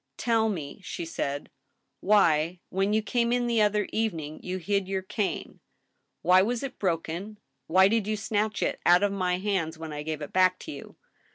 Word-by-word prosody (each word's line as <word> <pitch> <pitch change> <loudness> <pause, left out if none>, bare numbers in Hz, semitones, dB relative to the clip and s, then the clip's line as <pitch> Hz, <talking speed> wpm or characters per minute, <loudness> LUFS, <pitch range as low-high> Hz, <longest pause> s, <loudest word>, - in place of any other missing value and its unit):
" 135 - -54
Tell 225 -1 +2
me," 160 -3 -5
she 170 - -5
said, 145 -3 -4 0.2
" - - -50
why, 170 -4 +3
when 195 +2 0
you 215 0 +2
came 235 +1 +1
in 245 0 +1
the 235 -2 +2
other 210 0 +2
evening, 165 -9 -2
you 185 0 -4
hid 195 +1 -1
your 190 -1 -2
cane? 200 +1 -3 0.6
Why 185 +1 +6
was 235 +5 -1
it 275 - -6
broken? 180 +3 -2 0.3
Why 190 +3 +6
did 215 0 +1
you 215 0 0
snatch 210 0 -1
it - - -1
out 175 +3 +5
of 205 - +2
my 180 -2 0
hands 185 -5 -1
when 160 -1 -7
I 150 - -4
gave 155 0 -4
it 145 - -8
back 185 0 +4
to 315 - -7
you - - -10
190 Hz, 200 wpm, -27 LUFS, 165-215 Hz, 0.6 s, Why